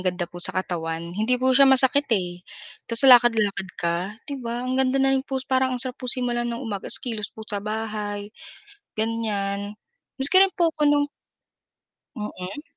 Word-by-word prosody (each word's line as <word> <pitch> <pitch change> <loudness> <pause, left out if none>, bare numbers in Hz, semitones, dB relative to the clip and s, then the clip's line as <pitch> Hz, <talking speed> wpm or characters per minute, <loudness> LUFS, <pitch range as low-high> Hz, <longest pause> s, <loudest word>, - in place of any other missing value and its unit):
ganda 180 0 -2
po 175 +1 -11
sa 175 - -1
katawan 170 -2 -3
hindi 220 +6 +1
po 260 +1 +2
siya 275 +1 +6
masakit, 265 +2 +4
eh. 175 -2 -4 0.5
'Tas 230 +3 +3
lakad-lakad 225 -7 +5
ka 170 0 0 0.3
,'di 280 -2 -6
ba, 240 +1 -4
ang 255 +1 0
ganda 265 0 +2
na 270 0 +3
rin 270 - +2
po 270 0 -4
parang 260 -1 +1
ang - - -7
sarap 255 -1 -6
po 250 - -5
simulan 240 -2 -1
mo 235 - -3
ng 260 - -7
umaga 205 -4 -5
'tas - - -5
kilos 220 -3 -4
po 220 - -11
sa 205 -2 -4
bahay, 210 -1 -4 0.6
ganyan, 210 -2 -2 0.4
maski 285 +8 +4
rin 390 -1 +5
po 335 -2 +2
'ko 300 -2 +1
nung 290 0 +2 1.1
Mm. 210 +3 -6
230 Hz, 185 wpm, -24 LUFS, 205-265 Hz, 1.1 s, siya